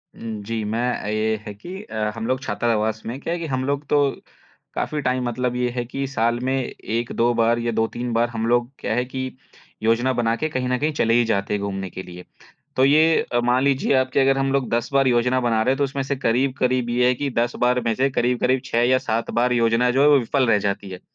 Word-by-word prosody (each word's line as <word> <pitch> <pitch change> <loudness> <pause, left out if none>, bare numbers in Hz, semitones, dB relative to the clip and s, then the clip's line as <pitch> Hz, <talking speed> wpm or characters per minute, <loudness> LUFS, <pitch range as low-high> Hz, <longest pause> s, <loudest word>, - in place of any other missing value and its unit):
उम, 110 -2 -6
जी, 115 +1 -3
मैं 110 +3 -2 0.2
अ, - - -5
ये 110 +1 0
है 105 - -6
कि 180 - -9
अ, 110 - -3
हम 115 0 -4
लोग 130 +1 0
छात्रावास 110 -1 -1
में 120 +4 -5
क्या 165 - -3
है 175 - -3
कि 170 - -4
हम 130 -2 -2
लोग 140 +1 -2
तो 145 - +4 0.7
काफ़ी 150 -1 -2
टाइम 125 -1 0
मतलब 125 +1 -2
ये 125 0 0
है 120 - -1
कि 135 +3 -4
साल 120 -3 0
में 130 +1 0
1-2 120 -2 -1
बार 115 0 +2
या 120 0 -1
2-3 120 +2 -2
बार 115 +1 +2
हम 115 -1 -3
लोग 120 0 +2
क्या - - -2
है 125 +1 0
कि 130 0 -5 0.5
योजना 120 +4 +2
बना 115 -2 +1
के 155 +6 -2
कहीं 130 -3 -2
न 125 - +1
कहीं 155 +2 0
चले 115 -5 +1
ही 120 0 +4
जाते 100 -2 -1
हैं 105 - -1
घूमने 95 -1 -4
के 95 - -7
लिए। 90 0 -11 0.5
तो 130 - +4
ये 155 +3 +4
अ, 120 - +3
मान 125 +2 +2
लीजिए 140 0 +2
आप 130 0 +1
कि - - +3
अगर 135 0 +3
हम 135 0 0
लोग 135 -3 0
10 120 0 0
बार 135 -1 +4
योजना 125 +1 +2
बना 115 -2 +1
रहे 130 - +2
हैं - - -4
तो 145 - +1
उसमें 135 0 -2
से 140 +1 -2
करीब-करीब 130 0 0
ये 125 +1 +2
है 125 - +4
कि 140 +3 -2
10 120 +1 0
बार 125 0 +2
में 115 - +2
से 135 +3 +2
करीब-करीब 125 0 +1
6 120 +1 +1
या 130 - +5
7 115 +1 -1
बार 125 +1 +2
योजना 115 +1 +2
जो 135 +2 +2
है 145 - +6
वो 145 - +6
विफल 130 +2 0
रह 105 - +5
जाती 100 0 -3
है। 90 -1 -8
120 Hz, 255 wpm, -22 LUFS, 115-130 Hz, 0.7 s, है